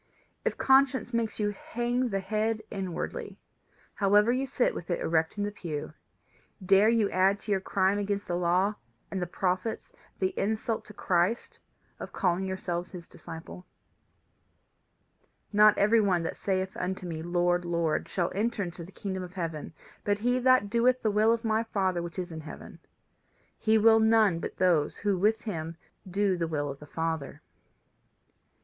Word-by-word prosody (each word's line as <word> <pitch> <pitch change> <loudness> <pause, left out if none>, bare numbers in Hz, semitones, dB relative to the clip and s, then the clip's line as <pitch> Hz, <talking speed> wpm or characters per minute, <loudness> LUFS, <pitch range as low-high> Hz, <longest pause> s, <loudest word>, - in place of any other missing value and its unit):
If - - -1
conscience 265 -1 +3
makes 230 -2 -1
you 205 -1 +1
hang 240 +4 -2
the 195 -2 -1
head 220 +2 -1
inwardly, 190 -4 -4 0.6
however 205 +3 +4
you 260 +2 0
sit 255 -1 +1
with 170 - -7
it 175 - 0
erect 160 +3 0
in 205 - -1
the 205 - -2
pew, 155 -7 -6 0.7
dare 195 +3 +5
you 225 -3 +2
add 190 +2 +3
to 210 - -5
your 195 -1 +2
crime 195 +1 +1
against 200 0 -2
the 175 - -2
law 180 +4 +2 0.4
and 190 - -2
the 180 - -2
prophets 185 +5 -2 0.3
the 185 -1 0
insult 220 +2 -1
to 210 - -12
Christ 180 +6 0 0.4
of - - -8
calling 185 0 0
yourselves 180 -2 -3
his 175 -3 -10
disciples? 165 +2 -10 1.9
"Not 210 0 +6
every 220 +2 +4
one 185 -5 +2
that 165 - -3
saith 190 -1 -2
unto 185 0 -3
me, 165 -2 -4
Lord, 175 +1 +1
Lord, 170 -2 -1
shall 175 -2 -1
enter 215 +1 -1
into 175 -1 -6
the 175 - -12
kingdom 190 -2 -4
of 180 0 -8
heaven, 165 -5 -4 0.3
but 205 0 +1
he 245 +4 +1
that 255 -5 +4
doeth 245 +2 +3
the 215 - +2
will 215 +2 +4
of 230 0 -1
my 220 0 +2
Father 190 -5 -1
which 170 +1 -7
is 180 -1 -4
in 160 -1 -6
heaven. 155 - -10 0.8
He 220 0 +3
will 225 +1 +6
none 220 -5 +4
but - - -6
those 170 -5 +2
who 205 -2 0
with 215 +5 +2
him 165 -6 -5 0.3
do 195 0 +1
the 165 -1 -1
will 145 -2 -2
of 140 - -10
the 150 - -12
Father." 160 -2 -3
195 Hz, 170 wpm, -28 LUFS, 175-220 Hz, 1.9 s, Not